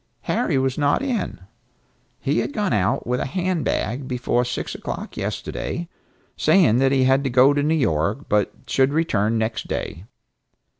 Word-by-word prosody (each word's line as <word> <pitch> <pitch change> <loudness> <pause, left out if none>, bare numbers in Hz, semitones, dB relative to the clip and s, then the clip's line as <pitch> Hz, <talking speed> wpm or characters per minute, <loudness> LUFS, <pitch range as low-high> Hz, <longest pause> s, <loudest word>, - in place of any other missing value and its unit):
Harry - - 0
was 130 +1 0
not 145 - +2
in. 255 -5 -2 0.8
He - - 0
had - - -2
gone 210 - 0
out 105 +6 +1
with 125 +1 0
a - - -2
hand 180 +1 -1
bag 125 +5 -2
before 125 -1 0
six 125 0 -4
o'clock - - -6
yesterday, 170 0 -4 0.5
saying 130 - +4
that 135 0 +3
he 135 -1 +3
had 135 +1 +3
to 135 - 0
go 130 +3 +5
to 145 - +1
New 155 +3 +2
York, 105 - 0
but 105 -1 +1
should 135 +2 +2
return 115 -9 +1
next 110 +1 -2
day. 90 - -4
130 Hz, 165 wpm, -22 LUFS, 115-150 Hz, 0.8 s, go